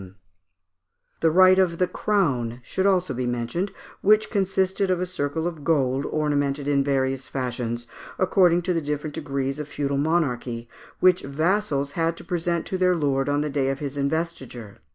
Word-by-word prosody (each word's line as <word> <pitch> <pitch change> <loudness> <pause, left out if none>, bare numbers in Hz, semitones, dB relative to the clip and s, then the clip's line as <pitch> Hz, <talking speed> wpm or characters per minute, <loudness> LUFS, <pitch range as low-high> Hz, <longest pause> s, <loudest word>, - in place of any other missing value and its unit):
] 90 -1 -49
The 165 - +4
right 185 +3 +6
of 175 -3 +2
"the 180 - +3
Crown" 135 - 0
should 190 +10 0
also 185 -6 +2
be 125 0 -2
mentioned, 120 +11 -2 0.3
which 215 +2 +4
consisted 190 -1 +1
of 185 -1 +1
a 180 - 0
circle 160 -2 -2
of 165 -4 -4
gold 140 -3 +1
ornamented 145 -2 -1
in 140 -1 +2
various 135 -1 0
fashions, 120 -2 -3 0.3
according 180 -2 +3
to 180 +1 0
the 165 - 0
different 150 0 -3
degrees 140 -2 -3
of 150 - -5
feudal 140 -1 -2
monarchy, 125 -7 -1 0.3
which 185 -1 +5
vassals 145 0 0
had 165 +1 -1
to - - -10
present 170 -2 -1
to 185 - -3
their 180 -1 +3
lord 140 -3 0
on 145 0 +1
the 150 - -1
day 135 -1 0
of 135 - -1
his 140 -1 -5
investiture. 140 -7 -3
150 Hz, 175 wpm, -24 LUFS, 135-180 Hz, 0.3 s, right